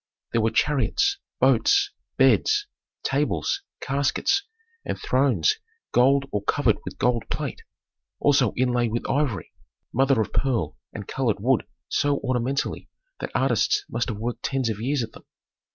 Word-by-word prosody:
There 115 Hz, -, +2 dB
were 110 Hz, -, +3 dB
chariots, 150 Hz, -, +1 dB, 0.2 s
boats, 405 Hz, 0 st, +4 dB, 0.3 s
beds, 415 Hz, -1 st, +4 dB, 0.4 s
tables, 395 Hz, -, 0 dB, 0.2 s
caskets, 140 Hz, -, +1 dB, 0.4 s
and -, -, -3 dB
thrones 130 Hz, -, +2 dB, 0.3 s
gold 135 Hz, +3 st, +4 dB
or 105 Hz, -, -1 dB
covered -, -, +1 dB
with -, -, -7 dB
gold 120 Hz, -2 st, 0 dB
plate, -, -, -3 dB, 0.6 s
also 135 Hz, -6 st, +4 dB
inlaid 120 Hz, -2 st, +1 dB
with 120 Hz, -, -2 dB
ivory, 135 Hz, -, -1 dB, 0.4 s
mother 135 Hz, 0 st, +3 dB
of 110 Hz, -, -1 dB
pearl 115 Hz, -, 0 dB, 0.2 s
and -, -, -7 dB
colored -, -, 0 dB
wood -, -, +1 dB, 0.2 s
so 145 Hz, 0 st, +1 dB
ornamentally 130 Hz, +1 st, -1 dB, 0.3 s
that -, -, -4 dB
artists 420 Hz, -1 st, +2 dB
must 120 Hz, -, -1 dB
have 110 Hz, -, -3 dB
worked 115 Hz, +3 st, -4 dB
tens 130 Hz, -4 st, 0 dB
of 105 Hz, -, -5 dB
years 135 Hz, +1 st, 0 dB
at 110 Hz, -, -6 dB
them. -, -, -15 dB
130 Hz, 140 wpm, -25 LUFS, 115-140 Hz, 0.6 s, boats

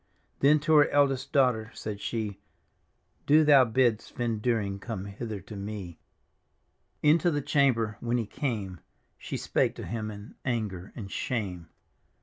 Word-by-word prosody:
Then 150 Hz, +2 st, +5 dB
to 160 Hz, +2 st, +2 dB
her 145 Hz, -, +6 dB
eldest 135 Hz, -1 st, +2 dB
daughter 125 Hz, -6 st, +2 dB
said 105 Hz, -2 st, -6 dB
she, 105 Hz, -4 st, -3 dB, 0.4 s
" -, -, -43 dB
Do 155 Hz, +2 st, +6 dB
thou 140 Hz, -4 st, +7 dB
bid 120 Hz, -1 st, +2 dB
Svend 115 Hz, -3 st, -3 dB
Dyring 105 Hz, -5 st, 0 dB
come 105 Hz, -5 st, -5 dB
hither 105 Hz, +1 st, -6 dB
to 105 Hz, +3 st, -10 dB
me," 100 Hz, -3 st, -6 dB, 1.0 s
Into 160 Hz, +4 st, +5 dB
the 145 Hz, -3 st, 0 dB
chamber 125 Hz, -7 st, +1 dB
when 120 Hz, +1 st, 0 dB
he 115 Hz, -, -1 dB
came 105 Hz, -, -3 dB, 0.4 s
She -, -, -5 dB
spake -, -, 0 dB
to -, -, -7 dB
him 110 Hz, -1 st, -4 dB
in 105 Hz, +1 st, -10 dB
anger 105 Hz, -7 st, -3 dB
and 100 Hz, -4 st, -7 dB
shame. 95 Hz, -9 st, -3 dB
115 Hz, 150 wpm, -28 LUFS, 100-135 Hz, 1.0 s, thou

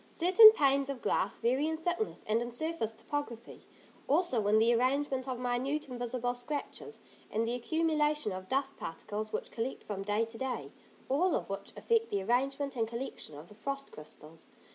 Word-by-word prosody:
Certain 370 Hz, +6 st, +9 dB
panes 275 Hz, -6 st, +2 dB
of 275 Hz, -2 st, -3 dB
glass -, -, +1 dB
vary 260 Hz, +6 st, +1 dB
in 320 Hz, 0 st, -1 dB
thickness 350 Hz, +6 st, -2 dB
and 220 Hz, +2 st, +2 dB
in 240 Hz, -, -3 dB
surface 245 Hz, -2 st, -2 dB
topography, 240 Hz, -1 st, -6 dB, 0.4 s
also 275 Hz, -, +2 dB
in 210 Hz, +1 st, +5 dB
the 230 Hz, +2 st, +5 dB
arrangement 265 Hz, +2 st, +1 dB
of 255 Hz, -2 st, -2 dB
minute, 255 Hz, +5 st, -1 dB
invisible 245 Hz, -1 st, -2 dB
scratches, 290 Hz, -, -5 dB, 0.3 s
and 225 Hz, +1 st, 0 dB
the 235 Hz, -, -1 dB
accumulation 300 Hz, 0 st, +1 dB
of 185 Hz, 0 st, -7 dB
dust 275 Hz, +1 st, 0 dB
particles 210 Hz, +6 st, -5 dB
which -, -, -4 dB
collect 235 Hz, +3 st, -4 dB
from 200 Hz, -2 st, -5 dB
day 210 Hz, +3 st, +1 dB
to 225 Hz, 0 st, -11 dB
day, 265 Hz, -1 st, -3 dB, 0.4 s
all 320 Hz, +6 st, +2 dB
of -, -, -3 dB
which 195 Hz, -, -5 dB
affect 455 Hz, -1 st, +1 dB
the 200 Hz, -1 st, -1 dB
arrangement 270 Hz, +5 st, 0 dB
and 225 Hz, -2 st, 0 dB
collection 235 Hz, -, -6 dB
of 155 Hz, +3 st, -11 dB
the 210 Hz, -, -13 dB
frost 275 Hz, +6 st, -5 dB
crystals. 155 Hz, +1 st, -12 dB
255 Hz, 175 wpm, -32 LUFS, 225-290 Hz, 0.4 s, Certain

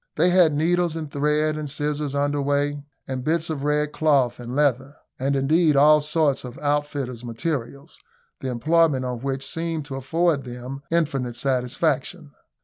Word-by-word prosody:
They 175 Hz, +4 st, +3 dB
had 175 Hz, -3 st, +5 dB
needles 170 Hz, +2 st, +1 dB
and 155 Hz, -3 st, -5 dB
thread 150 Hz, +2 st, +1 dB
and 155 Hz, -1 st, -4 dB
scissors 145 Hz, 0 st, -2 dB
under 145 Hz, 0 st, 0 dB
weigh, 145 Hz, +1 st, 0 dB, 0.3 s
and 130 Hz, -1 st, -4 dB
bits 160 Hz, +2 st, 0 dB
of 140 Hz, -3 st, -4 dB
red 150 Hz, 0 st, +1 dB
cloth 140 Hz, -7 st, +2 dB
and 120 Hz, +1 st, -6 dB
leather, 140 Hz, -1 st, +1 dB, 0.2 s
and 135 Hz, +2 st, 0 dB
indeed 150 Hz, +3 st, +3 dB
all 150 Hz, +2 st, +6 dB
sorts 150 Hz, -2 st, +1 dB
of 125 Hz, -1 st, -8 dB
outfitters' 145 Hz, -4 st, -2 dB
materials, 140 Hz, +3 st, -5 dB, 0.4 s
the 130 Hz, -, -4 dB
employment 150 Hz, +2 st, +2 dB
on 125 Hz, -1 st, -3 dB
which 135 Hz, +1 st, -3 dB
seemed 165 Hz, -2 st, -3 dB
to 140 Hz, -2 st, -6 dB
afford 150 Hz, +2 st, 0 dB
them 125 Hz, +2 st, -7 dB
infinite 140 Hz, -8 st, 0 dB
satisfaction. 140 Hz, +5 st, -1 dB
145 Hz, 155 wpm, -23 LUFS, 135-155 Hz, 0.4 s, all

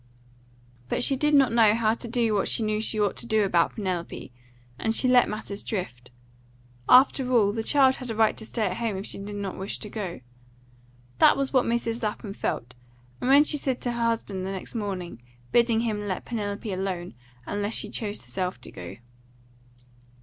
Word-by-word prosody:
But -, -, 0 dB
she 275 Hz, -, +3 dB
did 295 Hz, +2 st, +2 dB
not 270 Hz, -4 st, +5 dB
know 225 Hz, -2 st, +5 dB
how 220 Hz, -1 st, +2 dB
to 235 Hz, -, -7 dB
do 230 Hz, -1 st, +1 dB
what 200 Hz, -, +1 dB
she 230 Hz, -, +1 dB
knew 215 Hz, 0 st, 0 dB
she 220 Hz, 0 st, -2 dB
ought 205 Hz, -1 st, +1 dB
to -, -, -4 dB
do 220 Hz, -2 st, +3 dB
about 175 Hz, -4 st, +2 dB
Penelope, 180 Hz, -, -4 dB, 0.5 s
and 225 Hz, 0 st, 0 dB
she 255 Hz, -, +2 dB
let 250 Hz, -1 st, +5 dB
matters 205 Hz, -1 st, -4 dB
drift. 125 Hz, -, -5 dB, 0.8 s
After 255 Hz, 0 st, +5 dB
all, 215 Hz, -5 st, +4 dB
the 225 Hz, +2 st, -2 dB
child 265 Hz, +2 st, +4 dB
had 255 Hz, -2 st, -8 dB
a 225 Hz, -, -3 dB
right 220 Hz, 0 st, +3 dB
to 220 Hz, -, -5 dB
stay 225 Hz, -2 st, -1 dB
at -, -, -2 dB
home 225 Hz, -4 st, -2 dB
if 195 Hz, -, -5 dB
she -, -, -4 dB
did 205 Hz, +1 st, -6 dB
not 200 Hz, -2 st, -5 dB
wish 195 Hz, +2 st, -4 dB
to 210 Hz, -, -8 dB
go. 190 Hz, -, -5 dB, 1.0 s
That -, -, +6 dB
was 275 Hz, 0 st, -1 dB
what 255 Hz, -2 st, +4 dB
Mrs. 235 Hz, 0 st, -1 dB
Lapham 210 Hz, -2 st, -3 dB
felt, 125 Hz, -9 st, -3 dB, 0.5 s
and 250 Hz, -, -1 dB
what 285 Hz, +2 st, +7 dB
she 300 Hz, -, +1 dB
said 265 Hz, -3 st, -2 dB
to 245 Hz, -, -1 dB
her 235 Hz, 0 st, -2 dB
husband 215 Hz, -5 st, -1 dB
next 190 Hz, 0 st, -5 dB
morning, 185 Hz, -, -4 dB, 0.3 s
bidding 235 Hz, -1 st, +3 dB
him 210 Hz, -3 st, -2 dB
let 185 Hz, -, -3 dB
Penelope 205 Hz, -2 st, -4 dB
alone, 185 Hz, -2 st, -3 dB, 0.3 s
unless 205 Hz, +2 st, -2 dB
she -, -, -1 dB
chose 210 Hz, -3 st, -3 dB
herself 185 Hz, -1 st, -3 dB
to -, -, -7 dB
go. 90 Hz, -1 st, -8 dB
215 Hz, 195 wpm, -26 LUFS, 195-235 Hz, 1.0 s, what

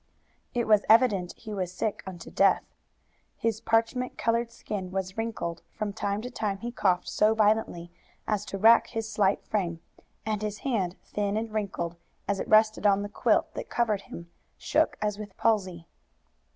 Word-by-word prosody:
It 240 Hz, -1 st, +1 dB
was 210 Hz, -2 st, +5 dB
evident 215 Hz, -6 st, +4 dB
he 220 Hz, -2 st, -8 dB
was 185 Hz, -3 st, -2 dB
sick 200 Hz, +3 st, -2 dB
unto 175 Hz, -3 st, -8 dB
death. 195 Hz, -, +4 dB, 0.7 s
His 225 Hz, -1 st, -1 dB
parchment 230 Hz, +3 st, 0 dB
colored 230 Hz, 0 st, 0 dB
skin 190 Hz, -5 st, -5 dB
was 185 Hz, 0 st, -3 dB
wrinkled; 225 Hz, -7 st, -3 dB
from 210 Hz, -2 st, -3 dB
time 200 Hz, 0 st, -2 dB
to 250 Hz, -, -6 dB
time 210 Hz, -5 st, -2 dB
he 235 Hz, +4 st, -5 dB
coughed 185 Hz, -6 st, +1 dB
so 215 Hz, +1 st, +3 dB
violently 210 Hz, -5 st, +1 dB, 0.4 s
as 210 Hz, -2 st, 0 dB
to 195 Hz, -, -5 dB
rack 225 Hz, +4 st, +6 dB
his 225 Hz, -1 st, -4 dB
slight 200 Hz, -2 st, +1 dB
frame, 175 Hz, -6 st, -1 dB, 0.5 s
and 215 Hz, -1 st, -1 dB
his 210 Hz, 0 st, -4 dB
hand, 195 Hz, -9 st, 0 dB
thin 205 Hz, 0 st, -1 dB
and 220 Hz, 0 st, -3 dB
wrinkled, 180 Hz, -5 st, -3 dB, 0.3 s
as 200 Hz, 0 st, 0 dB
it -, -, -3 dB
rested 215 Hz, -1 st, +4 dB
on 200 Hz, 0 st, +3 dB
the 205 Hz, -, -5 dB
quilt -, -, +1 dB
that -, -, -6 dB
covered 220 Hz, -4 st, +1 dB
him, 170 Hz, -2 st, -10 dB, 0.3 s
shook -, -, +1 dB
as 210 Hz, -1 st, -1 dB
with 205 Hz, -2 st, -9 dB
palsy. 185 Hz, -7 st, 0 dB
210 Hz, 170 wpm, -28 LUFS, 190-220 Hz, 0.7 s, rack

